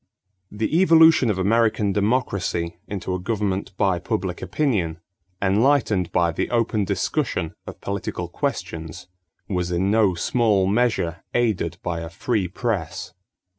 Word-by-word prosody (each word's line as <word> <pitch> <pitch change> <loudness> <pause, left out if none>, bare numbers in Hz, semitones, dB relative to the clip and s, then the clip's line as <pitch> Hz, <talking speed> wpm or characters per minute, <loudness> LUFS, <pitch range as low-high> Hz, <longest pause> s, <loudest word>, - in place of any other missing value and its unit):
= 95 -1 -50
The 155 +10 +2
evolution 160 -7 +6
of 105 - 0
American 105 0 +2
democracy 100 -6 -1
into 95 -2 -4
a 90 - -2
government 100 -1 -2
by 95 -4 +2
public 90 +1 -3
opinion, 95 - -1 0.4
enlightened 105 -2 +2
by 85 -1 +2
the 80 - -2
open 115 -3 +1
discussion 100 - -1
of - - -9
political 100 -1 -4
questions, 80 +2 -4 0.4
was 90 -2 -2
in 95 +3 +1
no 105 -4 +3
small 105 +1 +2
measure 100 -5 0
aided 100 -8 0
by 85 -2 -2
a 80 0 -6
free 105 +2 -1
press. 95 -3 -3
100 Hz, 130 wpm, -23 LUFS, 90-115 Hz, 0.4 s, evolution